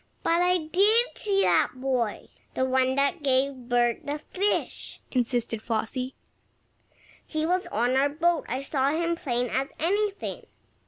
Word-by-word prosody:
"But 335 Hz, +1 st, +2 dB
I 360 Hz, 0 st, +3 dB
did 400 Hz, +9 st, +2 dB
see 395 Hz, -2 st, +1 dB
that -, -, +3 dB
boy 255 Hz, -4 st, -2 dB, 0.3 s
the 260 Hz, -, +1 dB
one 260 Hz, 0 st, +2 dB
that 280 Hz, +4 st, +1 dB
gave 275 Hz, 0 st, +2 dB, 0.2 s
Bert 240 Hz, -1 st, +2 dB
the 290 Hz, +1 st, -3 dB
fish," 390 Hz, +6 st, -2 dB
insisted 240 Hz, -3 st, -1 dB
Flossie. 245 Hz, +3 st, -3 dB, 1.1 s
"He 310 Hz, -1 st, -2 dB
was 360 Hz, +2 st, 0 dB
on 240 Hz, +4 st, +1 dB
our 275 Hz, +2 st, +3 dB
boat. 330 Hz, +2 st, +1 dB
I 260 Hz, +3 st, -2 dB
saw 275 Hz, -1 st, +1 dB
him 335 Hz, +3 st, 0 dB
as 340 Hz, -, -2 dB
plain 245 Hz, -2 st, -1 dB
as 270 Hz, +1 st, 0 dB
anything." 405 Hz, +5 st, -1 dB
280 Hz, 150 wpm, -26 LUFS, 255-345 Hz, 1.1 s, I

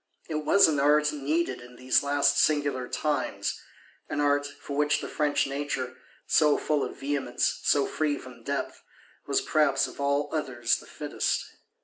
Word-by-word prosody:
It 155 Hz, -2 st, -3 dB
was 200 Hz, +6 st, +6 dB
an 150 Hz, -3 st, +1 dB
art 150 Hz, +1 st, +3 dB
needed 145 Hz, -2 st, -1 dB
in 125 Hz, 0 st, -13 dB
these 125 Hz, +1 st, +2 dB
last 145 Hz, 0 st, +2 dB
singular 145 Hz, -4 st, +1 dB
times: 150 Hz, +2 st, -2 dB, 0.5 s
an -, -, -2 dB
art, 145 Hz, 0 st, +2 dB
for 140 Hz, 0 st, -8 dB
which 150 Hz, +1 st, +2 dB
the -, -, -5 dB
French 150 Hz, -2 st, +1 dB
nature, 135 Hz, -2 st, -3 dB, 0.3 s
so 150 Hz, -2 st, +4 dB
full 150 Hz, -2 st, 0 dB
of -, -, -5 dB
vehemence, 135 Hz, -3 st, -1 dB
so 140 Hz, -1 st, +3 dB
free 150 Hz, -2 st, -1 dB
from 125 Hz, -2 st, -12 dB
depth, -, -, -4 dB, 0.5 s
was -, -, +2 dB
perhaps 140 Hz, -3 st, +2 dB
of -, -, -10 dB
all 140 Hz, +1 st, +1 dB
others 125 Hz, -7 st, 0 dB
the -, -, -13 dB
fittest. -, -, -2 dB
145 Hz, 160 wpm, -27 LUFS, 135-150 Hz, 0.5 s, was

